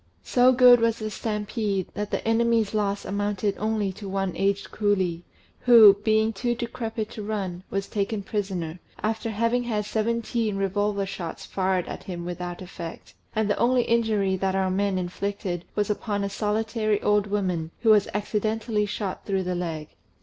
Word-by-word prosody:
So 250 +1 +5
good 250 -1 +7
was 230 0 +2
the 215 -1 -4
stampede, 210 -3 -2
that 210 0 -3
the - - -3
enemy's 225 -1 +2
loss 205 -1 -1
amounted 205 0 -1
only 215 -2 0
to 200 +1 -8
one 195 -1 -1
aged 200 0 0
coolie, 190 -5 0 0.4
who, 230 -5 +9
being 220 0 +3
too 240 +4 -1
decrepit 230 -2 -4
to 215 - -7
run, 200 -4 -3
was 195 0 -2
taken 200 0 -2
prisoner, 190 -5 -3 0.2
after 220 +1 -1
having 230 +3 +1
had 210 -3 -1
seventeen 225 0 -1
revolver 200 +1 0
shots 175 -4 -6
fired 185 -2 0
at - - -7
him 175 -2 -5
without 175 0 -5
effect; 170 -2 -8 0.2
and 220 -1 +1
the 205 - +1
only 245 +1 +3
injury 220 -5 +1
that 190 0 0
our 190 -1 +1
men 195 0 +1
inflicted 180 -1 -3
was 210 0 +1
upon 205 -1 -2
a 200 - -2
solitary 215 0 0
old 210 0 +3
woman, 185 -6 -1
who 225 -2 +5
was 210 -2 +5
accidently 210 +1 -1
shot 200 -2 -4
through 195 -2 0
the 180 0 -2
leg. 165 -4 -4
205 Hz, 165 wpm, -25 LUFS, 195-220 Hz, 0.4 s, who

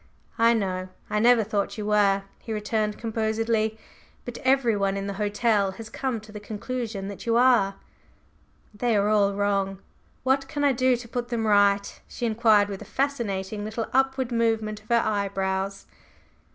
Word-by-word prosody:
"I 230 +1 +5
know. 185 -3 -2 0.2
I 210 - +1
never 235 0 +5
thought 205 0 -2
you 210 - -4
were," 200 -2 +3 0.2
he 225 - -8
returned 215 0 -1
composedly; 220 0 -1 0.5
"but 245 - -6
everyone 230 -7 +2
in 195 - -3
the 200 - -3
hotel 205 -1 +1
has 220 +1 -10
come 260 -4 -2
to 215 0 -14
the 210 - -7
conclusion 215 -1 -5
that 200 +3 -8
you 230 - +2
are!" 240 -6 +4 1.0
"They 230 +2 0
are 205 0 +2
all 200 -2 +3
wrong! 200 -1 0 0.5
What 270 +1 +1
can 290 +1 -3
I 285 - +5
do 255 0 +2
to 235 0 -10
put 240 +1 -3
them 235 -2 -2
right?" 200 -1 +2
she 240 - -5
inquired 220 -2 +4
with 200 -2 -6
a - - -13
fascinating 215 -7 -1
little 220 +2 -3
upward 265 -1 +1
movement 225 -2 0
of 215 - -25
her 235 -1 +3
eyebrows. 195 -2 -2
215 Hz, 165 wpm, -25 LUFS, 200-235 Hz, 1.0 s, I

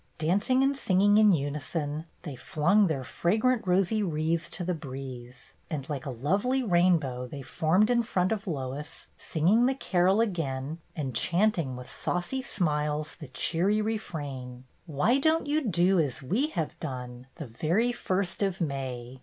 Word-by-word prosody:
Dancing 200 +11 +2
and 275 +1 +2
singing 205 -3 +3
in 215 -1 +6
unison, 150 0 -2 0.2
they 150 -6 -6
flung 190 +7 +2
their 140 -5 -2
fragrant 220 - +1
rosy 195 +4 +2
wreathes 165 -2 -1
to 180 - -5
the 180 +1 -1
breeze, 130 -4 -8 0.2
and 145 -4 -4
like 140 -1 -4
a - - -2
lovely 195 - 0
rainbow 170 - +2
they 140 +2 -8
formed 180 - +2
in 240 -1 +4
front 185 -5 0
of 215 -1 -2
Lois, 140 -2 -5
singing 190 +9 +2
the 265 - +1
carol 190 -4 +2
again, 160 -8 -2 0.2
and 135 -5 -3
chanting 170 - +1
with 125 0 -9
saucy 180 +10 -2
smiles 150 - -1
the 150 - -8
cheery 180 +10 0
refrain: 145 - -4
" - - -39
Why 165 - +2
don't 315 +3 +2
you 295 +2 +1
do 185 0 +3
as 140 -4 -1
we 215 - +1
have 165 - -4
done, 125 -3 -6
The 155 - -6
very 165 - 0
first 190 -6 -2
of 195 -2 0
May 130 -5 -4
170 Hz, 160 wpm, -28 LUFS, 140-205 Hz, 0.2 s, in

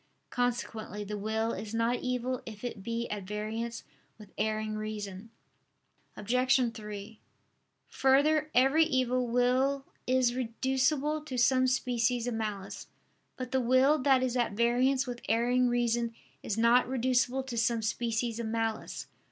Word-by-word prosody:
Consequently 230 -4 -2
the 210 +1 -5
will 220 +2 -1
is 210 +2 -5
not 230 +2 +1
evil 250 0 -2
if 215 -1 -9
it 235 -4 -5
be 230 +3 -3
at 210 -1 -3
variance 220 +3 -4 0.3
with 210 -2 -14
erring 215 0 -1
reason. 210 -1 -6 0.9
Obj. 250 +2 +2
3: 210 0 -8 0.7
Further, 300 +3 +3
every 270 +6 +5
evil 255 -4 +1
will 255 +3 +1 0.2
is 255 -1 +3
reducible 265 +5 0
to 260 -4 -5
some 255 +1 +4
species 245 -2 0
of 245 - -2
malice. 210 -3 -4 0.5
But 255 -1 -5
the 265 - +2
will 260 +5 +4
that 265 -1 +3
is 255 -1 -1
at 240 -4 0
variance 250 +4 +2
with 245 -2 -6
erring 245 +2 +3
reason 235 -1 0 0.3
is 215 - -3
not 235 +2 +4
reducible 255 +1 +1
to 260 -2 -6
some 230 0 +1
species 230 +1 -1
of 230 - -3
malice. 225 0 -3
240 Hz, 140 wpm, -30 LUFS, 225-255 Hz, 0.9 s, every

